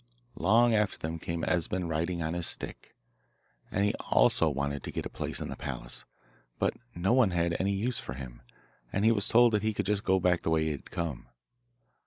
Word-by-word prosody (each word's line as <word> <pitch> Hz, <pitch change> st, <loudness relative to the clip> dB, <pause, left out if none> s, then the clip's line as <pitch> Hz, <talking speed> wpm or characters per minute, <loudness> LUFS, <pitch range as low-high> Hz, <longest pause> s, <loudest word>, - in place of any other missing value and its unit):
Long 115 Hz, +6 st, +5 dB
after 105 Hz, -2 st, +1 dB
them 80 Hz, +1 st, -4 dB
came 85 Hz, 0 st, -4 dB
Esben 90 Hz, 0 st, 0 dB
riding 85 Hz, +2 st, -1 dB
on 80 Hz, +1 st, -2 dB
his 85 Hz, -1 st, -1 dB
stick, -, -, -4 dB, 0.7 s
and 100 Hz, +2 st, +1 dB
he 105 Hz, -, +2 dB, 0.2 s
also 85 Hz, -, +4 dB
wanted 70 Hz, 0 st, -2 dB
to -, -, -6 dB
get -, -, -4 dB
a -, -, -3 dB
place -, -, -3 dB
in -, -, -4 dB
the -, -, -5 dB
palace, -, -, -5 dB, 0.5 s
but -, -, +1 dB, 0.2 s
no 95 Hz, +6 st, +2 dB
one 125 Hz, -5 st, +5 dB
had 85 Hz, -1 st, 0 dB
any 100 Hz, +1 st, +1 dB
use 115 Hz, +5 st, -1 dB
for 60 Hz, -, -6 dB
him, 60 Hz, -2 st, -9 dB, 0.5 s
and 100 Hz, +2 st, 0 dB
he 115 Hz, -, +6 dB
was 105 Hz, -2 st, +1 dB
told 120 Hz, 0 st, +5 dB
that 105 Hz, -, +2 dB
he 110 Hz, 0 st, -1 dB
could 100 Hz, -, -1 dB
just 100 Hz, +1 st, 0 dB
go 95 Hz, 0 st, +3 dB
back 90 Hz, -1 st, +2 dB
the -, -, -1 dB
way 80 Hz, -1 st, +3 dB
he 80 Hz, -, 0 dB
had 70 Hz, -, -7 dB
come. 80 Hz, -7 st, -4 dB
90 Hz, 215 wpm, -30 LUFS, 80-105 Hz, 0.7 s, he